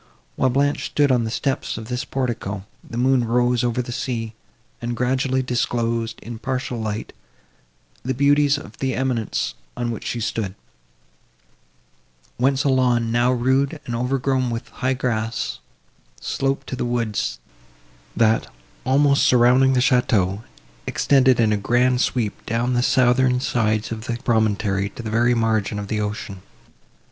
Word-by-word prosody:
While 130 - +2
Blanche 140 +3 +1
stood 145 -2 +2
on 120 -2 +2
the - - -2
steps 135 +4 -2
of 110 -1 -7
this 125 +3 -3
portico, 115 -8 -3 0.2
the 115 - -8
moon 130 0 +3
rose 120 +1 +2
over 120 +1 0
the 120 - -7
sea, 120 -4 -3 0.5
and 120 0 -3
gradually 130 +1 +1
disclosed, 115 -2 -1
in 115 -1 -7
partial 130 -2 -3
light, 110 0 -4 0.9
the 130 +1 -2
beauties 145 +1 +3
of 110 -6 -10
the 130 -1 -1
eminence, 120 - -1 0.2
on 120 -1 -1
which 115 - -6
she 120 - -2
stood, 110 -3 -3 1.8
whence 135 +2 +2
a 140 - +2
lawn, 125 -3 +2
now 120 +2 +3
rude 130 +5 +1
and 120 - -4
overgrown 130 +1 0
with 115 0 -5
high 130 +1 -1
grass, 115 -3 -2 0.6
sloped 135 0 -2
to - - -5
the - - -3
woods, 115 - -1 0.8
that, 110 -1 +2 0.4
almost 140 +1 +4
surrounding 125 +2 +5
the 125 - +3
château, 110 -7 +2 0.5
extended 130 -3 +3
in 110 -2 +3
a - - +1
grand 125 +4 +2
sweep 115 -5 -1
down 120 +3 0
the 120 - +2
southern 125 0 +3
sides 110 -4 0
of 110 0 -5
the 120 -2 -2
promontory 105 -4 +1
to 115 - -9
the 110 - -4
very 120 +2 +3
margin 110 -2 0
of 100 -1 -5
the 105 -1 -1
ocean. 105 -2 -5
120 Hz, 150 wpm, -22 LUFS, 115-130 Hz, 1.8 s, surrounding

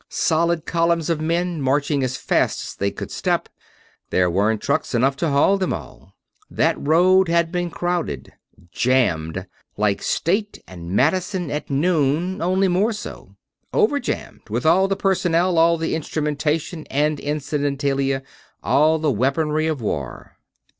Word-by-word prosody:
Solid 165 0 +1
columns 170 -1 +1
of 160 -2 -1
men, 170 0 -1
marching 140 +1 +1
as 130 0 -2
fast - - 0
as - - -8
they 100 - -1
could - - -7
step - - -1 0.6
there 90 -1 +2
weren't 105 +4 +1
trucks 140 0 -1
enough 135 +3 +2
to 165 +2 0
haul 145 +8 +3
them 185 - -1
all. 85 +6 -8 0.3
That - - +1
road 180 +5 +4
had 170 -1 +2
been 175 -1 -1
crowded 175 - -3 0.4
jammed. 95 -9 0 0.3
Like 105 -1 +1
State 205 +5 -1
and 85 -2 -9
Madison 175 - 0
at 150 0 -4
noon, 160 +4 +1
only 185 +3 +2
more 195 +6 +1
so. 210 - -9 0.4
Over 430 -11 +2
jammed - - -5
with - - -2
all 180 +4 +4
the 195 - 0
personnel, 180 -3 +1
all 170 +1 +4
the 165 0 -2
instrumentation 155 +1 -2
and 150 +1 0
incidentalia, 140 -2 -1 0.4
all 155 +2 +3
the 155 -2 0
weaponry, 150 +6 0
of 155 -5 -2
war. 70 - -5
155 Hz, 145 wpm, -21 LUFS, 135-175 Hz, 0.6 s, road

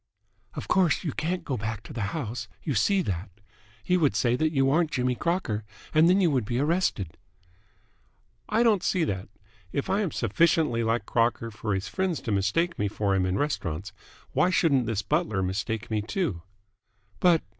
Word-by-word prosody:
"Of - - -5
course, 185 -4 +3
you 160 - -1
can't 170 +5 -2
go 135 -4 -2
back 110 0 -4
to - - -10
the 115 - -4
house. 115 -7 -4 0.2
You 150 - -1
see 195 +6 +2
that? 95 - -3 0.5
He 180 - +2
would 155 -6 +2
say 120 -2 +2
that 155 +4 +1
you 135 -3 +2
aren't 165 +1 +3
Jimmy 125 -3 0
Crocker 130 - -1 0.3
and 160 +2 +6
then 185 +2 +5
you 175 -5 +3
would 130 -4 +1
be 120 +3 -2
arrested." 140 - 0 1.3
"I 225 +2 +3
don't 215 -5 +4
see 180 -3 +1
that. 95 -10 -3 0.4
If 140 - -2
I 200 +2 +2
am 195 - 0
sufficiently 130 - +2
like 115 -1 0
Crocker 115 0 0
for 105 -1 -2
his 95 - -3
friends 190 -5 -1
to 115 - -3
mistake 105 - +1
me 105 - +1
for 100 -1 0
him 95 -1 +2
in 95 +1 0
restaurants, 95 - -2 0.4
why 180 - +3
shouldn't 140 -9 +3
this 110 -3 -1
butler 150 - 0
mistake 105 +5 -3
me, 105 -1 +1
too?" 110 - -2 0.8
"But 175 -3 +4
125 Hz, 185 wpm, -27 LUFS, 105-170 Hz, 1.3 s, and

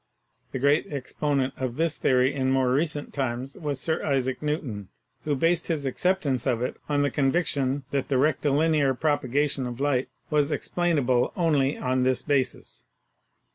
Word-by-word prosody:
The - - -3
great 140 +4 +2
exponent 140 -1 -1
of 130 -2 -3
this 165 +1 0
theory 130 +1 +2
in 130 -2 0
more 130 -1 +2
recent 150 +1 -1
times 130 0 -3
was 145 -6 -3
Sir 160 +3 -1
Isaac 130 -3 0
Newton, 135 - -3 0.4
who 150 -1 +1
based 165 +5 +1
his 155 -4 -1
acceptance 140 -2 0
of 120 0 +1
it 125 - -3
on 145 -1 +2
the 145 - +1
conviction 140 -2 +1
that 140 -2 -1
the 135 - +1
rectilinear 150 0 +2
propagation 145 -1 0
of 120 0 -6
light 135 -2 0 0.2
was 150 0 +2
explainable 145 -9 +1
only 150 -5 +2
on 130 0 0
this 130 0 +1
basis. 140 -3 -2
140 Hz, 155 wpm, -26 LUFS, 130-150 Hz, 0.4 s, great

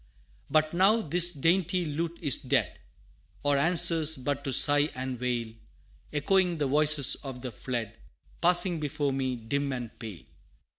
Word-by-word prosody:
But 155 0 +1
now, 200 +6 +3
this 175 +3 +4
dainty 175 +3 0
lute 165 +3 -4
is 145 -4 +2
dead 125 - -2 0.6
Or 145 0 +1
answers 160 0 +3
but 140 +2 -4
to 135 - -2
sigh 145 +3 +4
and 130 -1 -5
wail, 120 -3 -3 0.6
Echoing 175 +4 +1
the 150 - -1
voices 145 0 +2
of 130 -2 -8
the 125 - -5
fled, 115 -3 -5 0.5
Passing 175 0 +3
before 145 -1 -2
me 130 -1 -2
dim 140 +5 -3
and 120 -3 -6
pale! 110 -7 -9
145 Hz, 145 wpm, -27 LUFS, 130-170 Hz, 0.6 s, this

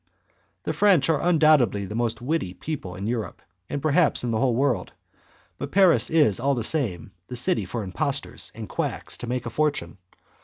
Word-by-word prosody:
The - - -2
French 185 -8 +3
are 155 - 0
undoubtedly 155 - +3
the 105 - -7
most 115 +1 -2
witty 130 - -2
people 95 - -6
in 95 +2 -6
Europe, 110 -6 -3 0.3
and 140 - -4
perhaps 155 -1 +3
in 120 - -1
the 110 - 0
whole 125 -1 +1
world, 135 -1 0 0.7
but - - -5
Paris 190 -2 +5
is, 150 - +3
all 140 +3 +1
the 120 - -3
same, 110 - 0 0.2
the 125 - -7
city 120 -4 +2
for 110 +4 -4
impostors 90 -2 -2
and - - -7
quacks - - -3
to 120 - -7
make 125 0 -3
a 120 - -5
fortune. 140 - -2
125 Hz, 185 wpm, -24 LUFS, 110-155 Hz, 0.7 s, Paris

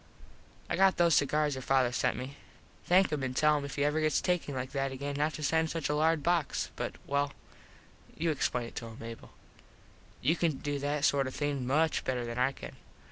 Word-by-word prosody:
I - - -1
got 195 0 +4
those 170 -1 +4
cigars 150 +1 +2
your 130 - -5
father 130 -2 +2
sent - - 0
me. 130 +2 -6 0.5
Thank 185 +2 +4
him 150 -2 -1
an 130 -1 -3
tell 150 +2 +4
him 140 - -5
if 140 - -6
he 140 - 0
ever 150 +2 +1
gets 155 0 +2
takin 180 -6 -1
like 130 0 -4
that 135 -1 -1
again 140 +2 -4
not 150 +2 0
to 155 - -6
send 160 +2 +2
such 165 -3 -2
a 150 - +1
large 160 0 +2
box 170 -2 0
but - - -4
well 140 0 0 0.8
you 165 0 +1
explain 125 -4 -1
it - - -11
to 115 - -4
him 115 0 -10
Mable. 115 0 -9 0.9
You 155 +7 +2
can 170 -2 +1
do 145 +1 -3
that 145 +1 0
sort 140 -2 +2
of 130 - -6
thing 145 -4 -2
much 155 +4 +2
better 125 -2 -2
than 120 +1 -4
I 125 +2 +3
can. - - -10
145 Hz, 220 wpm, -31 LUFS, 130-155 Hz, 0.9 s, got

